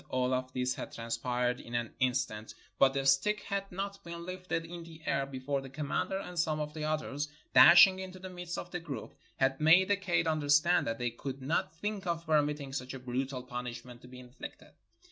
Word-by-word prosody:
All 130 0 +1
of 130 0 -1
this 125 0 0
had - - -7
transpired 120 +1 -1
in 120 - -7
an 120 -1 -2
in 130 -1 +2
stant; 110 +1 -3 0.2
but 135 0 +5
the 135 -1 0
stick 135 +11 +3
had 200 -1 -3
not 195 +2 -5
been 170 0 -7
lifted 185 -2 -3
in 170 +1 -8
the 165 -1 -12
air 140 0 0
before 135 +1 -2
the 135 - -9
commander 150 +7 -2
and 180 -3 -5
some 155 -2 +1
of 150 0 -3
the 155 -1 -5
others, 150 -1 -2 0.3
dashing 185 +2 +9
into 185 0 -7
the 185 0 -8
midst 175 -1 -6
of - - -6
the 175 - -3
group, 145 -9 -7 0.2
had 135 +2 +1
made 175 +5 +6
the 205 - +5
kaid 195 -4 +1
understand 155 +2 +3
that 115 0 -1
they 120 0 -1
could 135 +3 -6
not 155 +3 -1
think 205 +2 -4
of 170 -1 -2
permitting 150 -3 +1
such 130 -1 -4
a - - -7
brutal 130 +1 -3
punish 125 -1 -6
ment 120 -1 -12
to - - -13
be 125 0 -11
inflicted. 125 +1 -10
145 Hz, 215 wpm, -31 LUFS, 130-170 Hz, 0.3 s, dashing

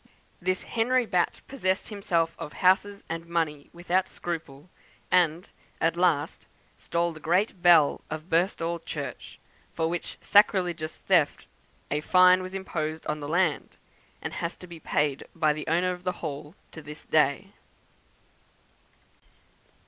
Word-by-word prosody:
This 185 +1 -1
Henry 245 +2 +1
Batt 180 -5 0
possessed 190 -8 -1
himself 170 -6 0
of 160 -3 -7
houses 200 +2 +2
and 165 +1 -5
money 160 -4 -2
without 180 +2 0
scruple; 160 -3 -6 0.4
and, 175 0 +3 0.3
at 165 0 +2
last, 170 -5 0 0.3
stole 170 0 -1
the 155 - -11
great 180 +4 0
bell 170 -5 +5
of 155 +1 -6
Birstall 170 -1 0
Church, - - -6 0.4
for 160 -1 +1
which 170 +1 -4
sacrilegious 180 -6 +2
theft - - +2 0.5
a 150 +1 0
fine 185 +2 +6
was 185 +1 -7
imposed 160 -4 -4
on 150 0 -2
the 145 0 -6
land, 170 -2 0 0.5
and - - -4
has 170 0 -3
to - - -12
be 170 -2 -11
paid 145 -2 0
by 155 -2 +2
the 150 +1 -6
owner 175 +3 +2
of 180 0 -7
the 180 - -1
Hall 150 +3 -6 0.2
to 160 - -9
this 150 0 -10
day. 155 +6 +2
170 Hz, 140 wpm, -27 LUFS, 155-185 Hz, 0.5 s, fine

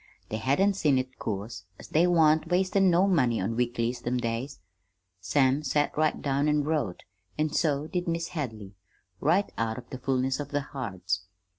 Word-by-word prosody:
They 110 - -2
hadn't 140 - +2
seen 150 -8 +2
it, 130 0 -4
'course, 100 -2 -5
as - - -11
they 170 +3 +3
wan't 160 -3 +4
wastin' 190 +2 +3
no 175 +2 +4
money 130 - +2
on 105 +5 -1
weeklies 120 0 -1
them 125 +1 -1
days. 120 +4 -3 0.6
Sam 135 +8 +2
set 145 0 0
right 155 0 +1
down 140 +1 0
an' 150 -1 +2
wrote, 145 - -2 0.3
an' 155 0 0
so 150 -2 +1
did 175 +2 -3
Mis' 170 0 -1
Hadley, 110 - -5 0.5
right 180 +7 +2
out 110 -1 -1
of 125 - -10
the 130 - -6
fullness 130 +1 0
of 145 - -5
their 145 0 -1
hearts. 95 - -4
140 Hz, 175 wpm, -28 LUFS, 115-155 Hz, 0.6 s, wan't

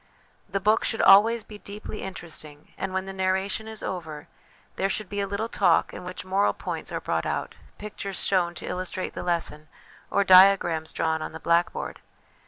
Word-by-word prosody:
The 195 +1 -1
book 215 +3 +3
should 225 - 0
always 220 +3 +6
be 210 -1 -12
deeply 210 +1 -8
interesting, 155 -5 -7
and 195 - -4
when 190 0 -2
the 195 - -6
narration 190 +3 -1
is 220 -1 -6
over, 160 -5 -5 0.5
there 195 - 0
should 205 -1 -2
be 205 - -4
a 200 - 0
little 200 +3 -2
talk 205 -4 +2
in - - -8
which 180 0 -6
moral 195 +2 +2
points - - -5
are - - -2
brought - - -2
out, - - -3 0.2
pictures 200 -2 -5
shown 175 -3 +2
to - - -7
illustrate 185 0 -4
the - - -5
lesson, 165 -3 -2 0.4
or 200 - +2
diagrams 185 -4 +6
drawn 160 -1 -1
on - - -5
the 160 - -7
blackboard. 170 +1 0
190 Hz, 185 wpm, -26 LUFS, 175-200 Hz, 0.5 s, always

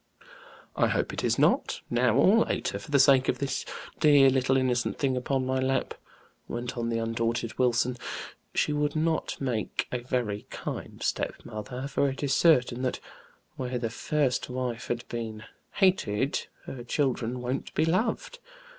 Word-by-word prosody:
"I - - +3
hope - - -1
it - - -4
is - - +2
not, - - +2
now 120 -1 +2
or 195 - +6
later - - -2
for - - -12
the 145 - +4
sake 135 -1 +5
of - - +1
this 140 -1 -2 0.4
dear 145 -4 +6
little 130 0 +2
innocent 125 -2 0
thing 135 -2 +1
upon 130 +1 0
my 130 0 0
lap," 130 0 0 0.5
went 120 +1 -4
on 115 -1 -2
the 115 - 0
undaunted 115 0 -2
Wilson. 125 0 +2 0.6
"She 150 - +2
would 150 0 0
not 160 +1 0
make 125 -5 -2
a 125 - -1
very 120 -4 -2
kind - - -6
stepmother, 125 +5 -3
for 140 0 +1
it 135 +2 -6
is 140 -2 +1
certain 125 -7 +4
that 130 -1 -1 0.6
where 125 -1 -2
the 115 -2 -2
first 140 -1 0
wife 125 -2 -3
had 120 0 -3
been 110 -2 -5 0.3
hated, 140 - +1 0.2
her 125 -3 -7
children 125 -2 -1
won't 125 +2 -3
be 160 - +3
loved. 220 - 0
130 Hz, 160 wpm, -28 LUFS, 120-140 Hz, 0.6 s, or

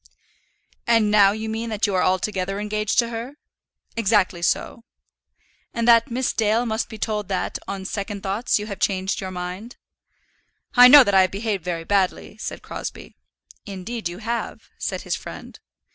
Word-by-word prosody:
"And 225 -3 +3
now 200 -2 +6
you 220 +1 -4
mean 225 +1 -3
that 215 0 0
you 205 - -1
are 185 - +2
altogether 185 +1 0
engaged 210 +1 -2
to 235 -2 +3
her?" 235 +4 -6 0.6
"Exactly 200 -5 +2
so." 200 +6 -1 0.9
"And 235 0 -1
that 230 +2 +6
Miss 250 +2 -1
Dale 225 +2 +1
must 220 0 -2
be 220 - -8
told 210 -2 -2
that, 185 -2 -2
on 195 -1 -5
second 200 0 -5
thoughts, 200 +5 0
you 210 - -4
have 200 -2 -7
changed 190 -1 -1
your 190 - -4
mind?" 185 +6 -7 1.0
"I 250 0 +9
know 280 +2 +10
that 200 - -1
I 190 - +7
have 185 - +3
behaved 200 -2 -3
very 170 -2 -3
badly," 195 +2 0
said - - -6
Crosbie. - - -7 0.5
"Indeed 200 +1 -5
you 175 - -8
have," 230 +3 -5
said - - -3
his - - -2
friend. - - -10
210 Hz, 170 wpm, -23 LUFS, 190-230 Hz, 1.0 s, know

